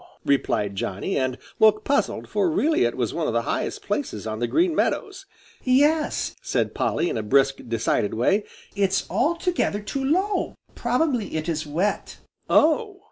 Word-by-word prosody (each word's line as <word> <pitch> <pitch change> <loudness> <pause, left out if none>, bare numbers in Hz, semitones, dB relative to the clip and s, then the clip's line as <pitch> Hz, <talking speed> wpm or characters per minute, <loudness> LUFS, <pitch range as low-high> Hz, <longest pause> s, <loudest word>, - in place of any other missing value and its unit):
replied 105 -7 +1
Johnny, 100 - -3
and 130 -2 0 0.2
looked 215 0 +5
puzzled, 280 0 0
for 360 - +1
really 325 +1 +2
it - - -2
was - - -1
one - - -1
of - - -1
the - - +1
highest - - -3
places 285 - -3
on 110 0 -4
the 120 - 0
Green 345 - +2
Meadows. 390 +3 -1 0.4
"Yes," 295 +4 +2
said - - -1
Polly, 175 - 0
in 115 - -2
a - - -1
brisk, 135 +5 +3
decided 115 -3 0
way, 190 - +2 0.3
"it's 195 -2 +1
altogether 335 - 0
too 270 +6 -4
low. 375 +9 0 0.2
Probably 245 - 0
it 155 +1 -2
is 155 -2 -2
wet." 175 +8 -2 0.3
"Oh!" 400 +6 +3
215 Hz, 160 wpm, -24 LUFS, -, 0.4 s, looked